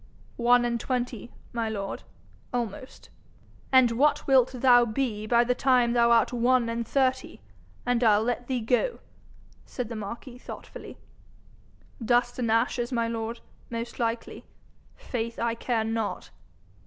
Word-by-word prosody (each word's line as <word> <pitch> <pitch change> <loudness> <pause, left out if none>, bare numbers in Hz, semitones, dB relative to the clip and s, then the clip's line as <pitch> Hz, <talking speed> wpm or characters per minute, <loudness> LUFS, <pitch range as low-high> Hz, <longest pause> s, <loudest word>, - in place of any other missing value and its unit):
'One 240 0 +4
and 235 -1 -1
twenty, 245 -2 -3 0.2
my 230 -2 -1
lord 200 -2 -4 0.5
almost.' 245 +1 -5 0.6
'And 260 -3 +6
what 280 +6 +2
wilt 260 -2 +4
thou 245 -1 +5
be 215 -2 -2
by 235 +1 +4
the 250 +1 +1
time 250 -2 +2
thou 235 -1 +4
art 235 +1 +3
one 245 0 +2
and 230 0 -3
thirty, 260 -1 0 0.5
an' 245 0 +1
I'll 215 -1 +4
let 245 +1 -2
thee 255 -2 -1
go,' 250 - 0 0.7
said 245 -3 -6
the 230 - -5
marquis 235 +4 -7
thoughtfully. - - -10 1.1
'Dust 245 +2 +1
and 235 -2 0
ashes, 235 +2 +1
my 235 -2 0
lord, 230 0 -4 0.3
most 230 0 -5
likely. 230 0 -3 0.5
Faith, 230 -1 -5
I 235 0 0
care 230 -1 -1
not.' 225 -1 -3
235 Hz, 140 wpm, -27 LUFS, 230-250 Hz, 1.1 s, And